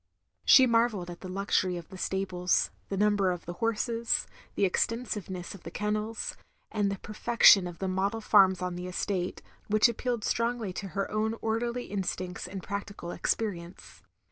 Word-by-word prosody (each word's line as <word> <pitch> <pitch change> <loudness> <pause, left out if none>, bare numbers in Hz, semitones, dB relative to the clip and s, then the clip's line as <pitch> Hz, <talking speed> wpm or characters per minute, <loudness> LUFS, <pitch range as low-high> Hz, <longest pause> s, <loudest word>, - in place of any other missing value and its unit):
She 260 - +8
marvelled 230 -7 +1
at 175 - -11
the 185 - -7
luxtiry 185 -1 0
of 170 - -9
the 190 - -10
stables, 185 -2 0 0.2
the 195 - -2
number 205 -1 +3
of 175 -1 -3
the 175 - -5
horses, 230 +1 0 0.3
the 200 - +3
extensiveness 195 -3 -2
of 200 - -12
the - - -8
kennels, 210 +3 -2 0.4
and 205 -2 +1
the 195 - -3
perfection 210 -2 +5
of 175 -1 -8
the 190 - -3
model 195 +4 0
farms 190 -4 +4
on 180 -1 -2
the 180 +1 -5
estate, 180 0 -2 0.2
which 215 +2 +5
appealed 235 -1 -2
strongly 230 -4 -1
to 195 - -5
her 195 - -1
own 215 +1 0
orderiy 235 +2 -2
instincts 185 -2 -3
and 190 0 -7
practical 200 -3 -5
experience. 180 -5 -3
200 Hz, 165 wpm, -29 LUFS, 185-225 Hz, 0.4 s, She